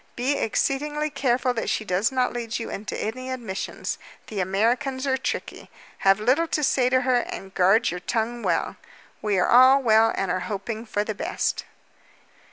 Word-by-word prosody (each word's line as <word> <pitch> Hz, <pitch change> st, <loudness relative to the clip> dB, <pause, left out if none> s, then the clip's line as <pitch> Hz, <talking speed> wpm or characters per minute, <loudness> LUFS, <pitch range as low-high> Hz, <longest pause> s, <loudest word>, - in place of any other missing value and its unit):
Be 260 Hz, +4 st, 0 dB
exceedingly 295 Hz, +6 st, -1 dB
careful 260 Hz, -2 st, +1 dB
that 225 Hz, -, -2 dB
she 215 Hz, -, -1 dB
does 190 Hz, +6 st, +1 dB
not 255 Hz, -1 st, 0 dB
lead 235 Hz, -1 st, -3 dB
you 230 Hz, -, -5 dB
into 210 Hz, +2 st, -5 dB
any 255 Hz, +4 st, -4 dB
admissions. 230 Hz, -7 st, -4 dB, 0.3 s
The 210 Hz, -, -5 dB
Americans 235 Hz, +8 st, 0 dB
are 265 Hz, -1 st, +2 dB
tricky. 260 Hz, -1 st, -4 dB, 0.3 s
Have 195 Hz, +1 st, +4 dB
little 260 Hz, +10 st, +2 dB
to 305 Hz, -, -1 dB
say 255 Hz, -2 st, +2 dB
to 255 Hz, 0 st, +3 dB
her, 255 Hz, -1 st, +2 dB
and 195 Hz, -5 st, -5 dB
guard 195 Hz, +6 st, +3 dB
your 180 Hz, -, -4 dB
tongue 230 Hz, +5 st, -2 dB
well. -, -, -1 dB, 0.4 s
We 210 Hz, -2 st, 0 dB
are 180 Hz, -, +2 dB
all 255 Hz, +3 st, +7 dB
well 225 Hz, -1 st, +5 dB
and 195 Hz, -2 st, -1 dB
are 185 Hz, -, 0 dB
hoping 220 Hz, +3 st, -5 dB
for 205 Hz, -1 st, -1 dB
the 215 Hz, -, -3 dB
best.'" -, -, -2 dB
235 Hz, 175 wpm, -24 LUFS, 210-260 Hz, 0.4 s, all